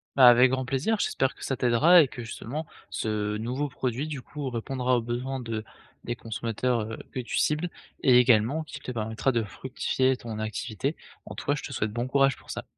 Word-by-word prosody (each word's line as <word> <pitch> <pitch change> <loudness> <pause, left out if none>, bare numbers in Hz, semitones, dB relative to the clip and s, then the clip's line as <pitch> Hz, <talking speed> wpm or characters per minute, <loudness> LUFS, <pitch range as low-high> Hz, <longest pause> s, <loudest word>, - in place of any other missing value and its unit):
Bah, 130 -2 +8
avec 125 +1 +8
grand 130 0 -1
plaisir, 135 - 0
j'espère 135 -8 0
que - - -8
ça 135 - -1
t'aidera 130 +9 +6
et 150 - +3
que, 125 -1 -8
justement, 130 +7 -5 0.2
ce 105 -1 -2
nouveau 125 +6 -2
produit 130 +2 -2
du 145 -4 -5
coup 140 +1 -5
répondra 125 +1 0
aux - - 0
besoins 125 +3 -3
de 115 -3 -4 0.4
des 120 - -2
consommateurs, 115 +2 -1
heu, - - -5
que - - -4
tu 120 - -3
cibles 155 +4 +1 0.3
et 125 -2 +7
également 125 +5 +4
qui 150 -2 -9
te 140 - -9
permettra 110 +3 -1
de 115 -1 +1
fructifier 130 +3 0
ton 115 -4 -7
activité. 110 +6 -3 0.3
En - - -8
tout - - -7
cas, 145 - +2
je - - -5
te 140 - -6
souhaite 110 -3 -1
bon 120 +3 -2
courage 135 0 +3
pour - - -19
ça. - - -5
125 Hz, 210 wpm, -27 LUFS, 115-135 Hz, 0.4 s, Bah